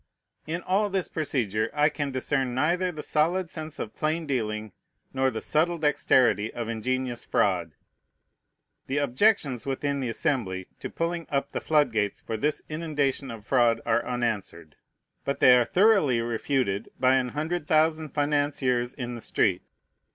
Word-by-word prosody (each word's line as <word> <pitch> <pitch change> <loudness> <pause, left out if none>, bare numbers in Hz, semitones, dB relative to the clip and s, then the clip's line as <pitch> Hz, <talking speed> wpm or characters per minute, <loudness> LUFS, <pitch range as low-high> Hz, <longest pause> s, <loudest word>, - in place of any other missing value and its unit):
In 170 +3 -3
all 200 +3 +1
this 190 -2 0
procedure 115 -8 -1
I 150 +1 +4
can 145 -1 -3
discern 130 -1 -1
neither 175 +7 +1
the 155 -3 -7
solid 170 +3 +1
sense 155 -1 -7
of 110 - -5
plain 160 +2 -1
dealing 110 -6 -2 0.4
nor 135 0 +2
the 110 -3 -5
subtle 170 +3 +1
dexterity 130 - +2
of 120 -2 -5
ingenious 125 +2 -2
fraud. 85 -5 0 1.1
The 135 - -1
objections 140 - +1
within 140 +1 -1
the 130 -3 -2
Assembly 115 - -1
to - - -5
pulling 170 0 -3
up 140 0 -1
the - - -3
flood 150 -4 +2
gates 105 -2 -1
for 115 - -5
this 150 +7 -1
inundation 145 -4 -2
of 115 -3 -8
fraud 120 -2 +3
are 120 0 +2
unanswered; 105 -10 -3 0.5
but 140 - -2
they 125 - +8
are 120 -1 +4
thoroughly 185 - +4
refuted 115 -2 -1
by 130 0 +4
an 125 -1 0
hundred 160 +1 -2
thousand 155 0 +2
financiers 145 -4 0
in 125 -3 -5
the 120 - -7
street. 95 -4 +1
135 Hz, 155 wpm, -26 LUFS, 115-155 Hz, 1.1 s, they